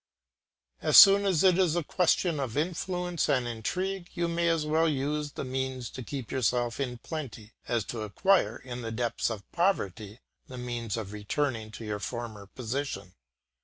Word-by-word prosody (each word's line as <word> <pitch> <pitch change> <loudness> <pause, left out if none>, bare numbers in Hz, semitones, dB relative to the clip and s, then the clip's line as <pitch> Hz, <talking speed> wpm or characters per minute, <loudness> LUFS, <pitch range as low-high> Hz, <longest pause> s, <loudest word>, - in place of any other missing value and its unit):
As - - +5
soon 200 0 +9
as 185 -4 +2
it 185 -1 +5
is 175 -4 +3
a 175 - 0
question 175 -1 +1
of 130 -2 -3
influence 175 +1 -1
and 125 -3 +2
intrigue 180 - -3
you 170 -1 0
may 170 0 +1
as 165 -2 +1
well 160 +2 +2
use 145 +1 -2
these - - -4
means 130 -2 -3
to 130 - -7
keep 130 0 -6
yourself 120 -2 0
in 125 -3 -2
plenty, 115 -6 -7
as 120 -3 0
to 110 +3 -5
acquire, 185 - +2
in 125 -1 -7
the 115 -1 -4
depths 115 +1 -1
of 110 -3 -5
poverty, 110 - -1 0.3
the 130 - -9
means 120 -3 -3
of 105 -2 -5
returning 110 +2 -2
to 115 - -8
your 105 -1 -3
former 110 -3 -6
position. 115 -5 -4
130 Hz, 170 wpm, -29 LUFS, 115-165 Hz, 0.3 s, soon